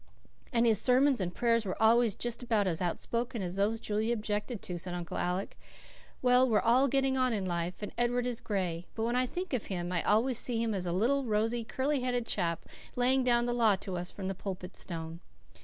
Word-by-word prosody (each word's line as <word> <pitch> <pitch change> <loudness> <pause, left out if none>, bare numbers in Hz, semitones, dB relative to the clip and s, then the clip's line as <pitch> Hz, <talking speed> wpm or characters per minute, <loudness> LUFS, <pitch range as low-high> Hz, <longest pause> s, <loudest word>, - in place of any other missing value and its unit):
"And 235 -2 +3
his 220 -3 +4
sermons 260 -1 +3
and 175 -1 -1
prayers 230 +3 +1
were 190 -3 -4
always 225 -1 +4
just 240 0 -3
about 225 -4 +1
as 175 -3 -1
outspoken 230 +5 -2
as 180 0 -3
those 210 +3 +1
Julia 220 +2 0
objected 210 +1 -3
to," 175 -1 -4
said 175 +1 -5
Uncle 175 -2 -4
Alec. 180 +2 -2 0.6
"Well, 250 +1 +5
we're 215 - +4
all 250 +4 +4
getting 270 0 +1
on 255 -2 +2
in 200 -3 -1
life 175 +2 -3
and 205 - -4
Edward 245 0 +1
is 245 -2 -3
gray; 180 -4 -2
but 220 - -2
when 235 +2 0
I 255 0 +2
think 360 +3 -5
of 245 - -1
him 175 -2 -3
I 175 -2 +1
always 230 +3 +2
see 240 -2 -1
him 230 -1 0
a 195 - -1
little, 215 +11 +1
rosy, 225 +2 0
curly 270 +5 -1
headed 245 -2 -1
chap, 170 -6 -1 0.3
laying 255 +2 +3
down 240 -1 +3
the 240 - 0
law 225 -4 +4
to 190 -1 -6
us 180 +1 -4
from 190 -2 -6
the 195 - -1
Pulpit 185 -1 -6
Stone. 165 -1 -6
225 Hz, 215 wpm, -31 LUFS, 185-245 Hz, 0.6 s, Well